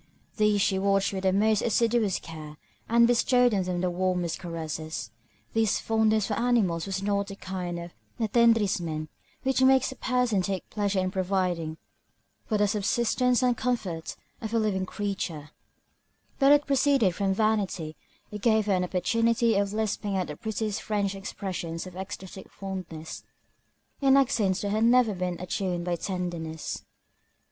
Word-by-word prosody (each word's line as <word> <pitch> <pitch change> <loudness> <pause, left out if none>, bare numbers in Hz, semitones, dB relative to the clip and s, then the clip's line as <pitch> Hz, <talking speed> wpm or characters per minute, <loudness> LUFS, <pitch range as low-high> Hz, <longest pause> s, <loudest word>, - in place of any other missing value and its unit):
These 210 -2 +3
she 195 -1 +2
watched 195 0 +2
with 190 - -3
the 190 0 +2
most 215 +2 +3
assiduous 230 -3 +2
care, 155 -2 -9 0.3
and 235 +1 +6
bestowed 245 0 +3
on 195 - +2
them 180 -1 -2
the 180 -1 0
warmest 180 -1 -1
caresses. 160 - -5 0.4
This 225 -2 +2
fondness 220 -1 +2
for 215 - -2
animals 205 -8 +1
was 195 0 -3
not 200 0 0
that 195 - -9
kind 180 -2 -4
of 170 0 -8 0.3
attendrissement 205 -9 +2 0.3
which 265 0 +1
makes 265 0 +4
a - - -8
person 250 -7 +1
take 190 -1 -3
pleasure 205 -2 -1
in 185 0 0
providing 180 -4 -1 0.7
for 215 - +1
the 205 0 +3
subsistence 240 +4 +1
and 250 -1 +3
comfort 215 -9 -2 0.3
of 225 0 -3
a - - +4
living 195 -4 0
creature; 180 -8 -4 0.9
but 275 0 +6
it 290 0 +5
proceeded 275 -8 +3
from 195 +2 0
vanity, 195 -7 0 0.4
it 210 -1 -6
gave 220 -2 +3
her 205 - +2
an 180 -1 +1
opportunity 230 +6 +2
of 200 -1 +1
lisping 210 -2 -1
out 185 - 0
the 150 - -7
prettiest 220 +2 -3
French 205 -2 -1
expressions 185 -4 -5
of 185 -1 -10
ecstatic 190 0 -8
fondness, 185 -5 -7 0.8
in 275 0 +5
accents 205 -8 +2
that 205 - -2
had 215 +2 +1
never 240 -2 +4
been 180 -1 -3
attuned 180 -1 -2
by 175 -1 0
tenderness. 170 -3 -4
200 Hz, 155 wpm, -27 LUFS, 180-225 Hz, 0.9 s, and